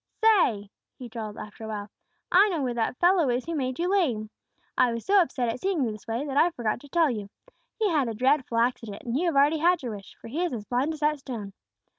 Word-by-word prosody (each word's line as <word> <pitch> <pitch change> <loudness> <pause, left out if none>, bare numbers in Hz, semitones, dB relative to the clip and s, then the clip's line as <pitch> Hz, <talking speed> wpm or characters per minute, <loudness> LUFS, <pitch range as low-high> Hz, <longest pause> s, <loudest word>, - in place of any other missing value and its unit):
"Say," 250 - +3 0.3
he 250 - -8
drawled, 220 -2 -6
after 210 +1 -8
awhile, 210 -1 -5 0.4
"I 395 +4 +6
know 330 -7 -1
where 250 -2 -1
that 235 +1 -1
fellow 350 -5 +4
is 245 +1 0
who 335 - -4
made 260 -4 -2
you 345 - 0
lame. 255 - +1 0.4
I 250 - +4
was 230 0 -5
so 400 0 +5
upset 255 -8 -1
at 230 - -2
seeing 375 -4 0
you 230 - 0
this 215 -1 -11
way 230 +5 -2
that 280 -1 -3
I 335 - +5
forgot 235 -10 -2
to 285 - -14
tell 325 -2 +3
you. 210 -4 -5 0.5
He 440 -1 +2
had 300 -8 +1
a 225 - -4
dreadful 255 0 +1
accident, 230 -3 -1
and 235 0 -3
you 345 +6 +1
have 330 - 0
already 290 +3 +4
had 345 -1 +3
your 235 -4 -4
wish, 200 -1 -12
for - - -11
he 305 +10 -2
is 350 - -1
as 215 -4 -5
blind 255 +7 0
as 305 - -14
that 300 0 +2
stone." 220 -7 -7
255 Hz, 250 wpm, -27 LUFS, 230-330 Hz, 0.5 s, I